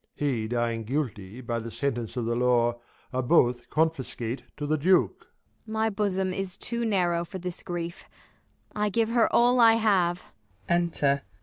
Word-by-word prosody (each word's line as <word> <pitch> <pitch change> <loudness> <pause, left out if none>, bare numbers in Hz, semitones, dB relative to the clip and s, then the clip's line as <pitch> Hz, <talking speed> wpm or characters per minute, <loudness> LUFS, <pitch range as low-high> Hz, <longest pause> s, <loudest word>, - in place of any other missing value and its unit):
He 125 -7 -1
dying 115 -1 -1
guilty 120 -5 -3
by 115 -1 -2
the 115 0 -6
sentence 120 -2 -3
of 120 - -1
The 115 +1 0
law, 120 -1 +2 0.3
ai'e 130 - 0
both 120 -3 +2
confiscate 135 -6 -1 0.2
to 150 - -3
the 155 +1 +1
Duke. 180 +5 +2 0.4
Ang. 220 - -7
My 220 0 +1
bosom 190 -2 -1
is 190 -1 -3
too 235 0 -3
narrow 175 -6 +1
for 190 +3 -8
this 180 -1 -5
grief; 175 0 -6 0.7
I 210 0 +1
'Ave 225 +3 +1
her 235 -2 +3
all 245 +1 +4
I 230 -1 +8
have. 195 -6 +2
II - - -19 0.5
THE - - +4
LAW - - +5
AGAINST 170 -1 -2
LOVERS. 140 0 +4
160 Hz, 185 wpm, -27 LUFS, 120-190 Hz, 0.7 s, I